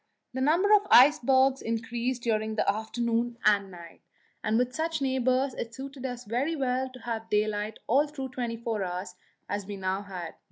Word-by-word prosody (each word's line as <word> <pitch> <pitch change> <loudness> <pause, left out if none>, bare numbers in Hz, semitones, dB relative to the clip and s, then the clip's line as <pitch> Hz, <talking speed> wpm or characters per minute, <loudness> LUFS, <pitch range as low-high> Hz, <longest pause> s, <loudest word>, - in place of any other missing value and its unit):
The 260 - -3
number 345 +9 +4
of 410 -1 +5
icebergs 265 0 +6
increased 235 +2 -2
during 220 -1 0
the - - 0
afternoon 230 +3 -1
and 200 -1 +4
night, 170 -2 -12 0.4
and 215 +1 +1
with 250 +1 0
such 320 +1 -1
neighbours 260 0 +1
it 230 -1 -6
suited 270 0 -6
us 245 -1 -6
very 260 +9 -1
well 260 -2 -1
to 255 0 -13
have 225 -1 -4
daylight 210 0 0
all 280 +6 +3
through 270 -3 -6
the - - -19
twenty 240 -2 -3
four 225 -3 -2
hours, 180 +1 -4 0.3
as 205 -1 -4
we 205 -1 -5
now 190 +1 -1
had. 185 -5 -7
240 Hz, 185 wpm, -28 LUFS, 215-265 Hz, 0.4 s, icebergs